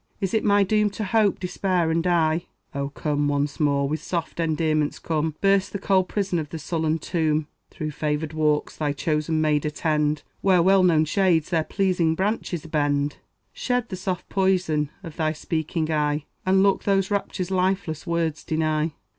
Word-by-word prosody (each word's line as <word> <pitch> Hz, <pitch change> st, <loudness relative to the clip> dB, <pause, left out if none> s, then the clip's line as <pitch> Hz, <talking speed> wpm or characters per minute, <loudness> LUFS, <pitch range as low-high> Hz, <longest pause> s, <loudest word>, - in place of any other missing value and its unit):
Is 195 Hz, -1 st, -2 dB
it 220 Hz, -, +2 dB
my 205 Hz, 0 st, +4 dB
doom 210 Hz, +1 st, +2 dB
to 220 Hz, -, -2 dB
hope, 205 Hz, 0 st, +2 dB
despair, 180 Hz, -2 st, 0 dB
and 165 Hz, +1 st, +1 dB
die? 165 Hz, -2 st, +1 dB, 0.3 s
O, 140 Hz, -1 st, -2 dB
come 145 Hz, 0 st, -1 dB
once 145 Hz, 0 st, -1 dB
more, 140 Hz, -2 st, +2 dB
with 155 Hz, +1 st, -2 dB
soft 170 Hz, -1 st, -4 dB
endearments 155 Hz, -2 st, 0 dB
come; 160 Hz, -1 st, -2 dB
Burst 195 Hz, -1 st, +2 dB
the -, -, -1 dB
cold 190 Hz, -1 st, +2 dB
prison 195 Hz, -4 st, -1 dB
of 150 Hz, -2 st, -5 dB
the 165 Hz, -, -5 dB
sullen 160 Hz, 0 st, -1 dB
tomb; 155 Hz, -2 st, 0 dB, 0.2 s
Through 155 Hz, 0 st, -5 dB
favored 150 Hz, +1 st, -2 dB
walks 150 Hz, -1 st, 0 dB
thy 150 Hz, -2 st, -1 dB
chosen 155 Hz, +2 st, 0 dB
maid 150 Hz, -2 st, +2 dB
attend 150 Hz, 0 st, 0 dB, 0.2 s
Where 185 Hz, -3 st, +4 dB
well 190 Hz, +1 st, +5 dB
known 165 Hz, -4 st, +4 dB
shades 175 Hz, -1 st, +2 dB
their 165 Hz, -2 st, +2 dB
pleasing 180 Hz, -3 st, +1 dB
branches 190 Hz, -4 st, -2 dB
bend; 145 Hz, -2 st, 0 dB, 0.4 s
Shed 245 Hz, -2 st, -1 dB
the 185 Hz, -, -4 dB
soft 185 Hz, -1 st, -4 dB
poison 180 Hz, -6 st, +1 dB
of 165 Hz, -3 st, -9 dB
thy 155 Hz, -2 st, 0 dB
speaking 160 Hz, +1 st, -2 dB
eye, 150 Hz, -1 st, 0 dB, 0.2 s
And 190 Hz, +1 st, +4 dB
look 195 Hz, -1 st, +2 dB
those 195 Hz, 0 st, +1 dB
raptures 190 Hz, -2 st, -2 dB
lifeless 185 Hz, -4 st, -1 dB
words 165 Hz, -2 st, -1 dB
deny. 155 Hz, 0 st, 0 dB
160 Hz, 170 wpm, -24 LUFS, 150-185 Hz, 0.4 s, well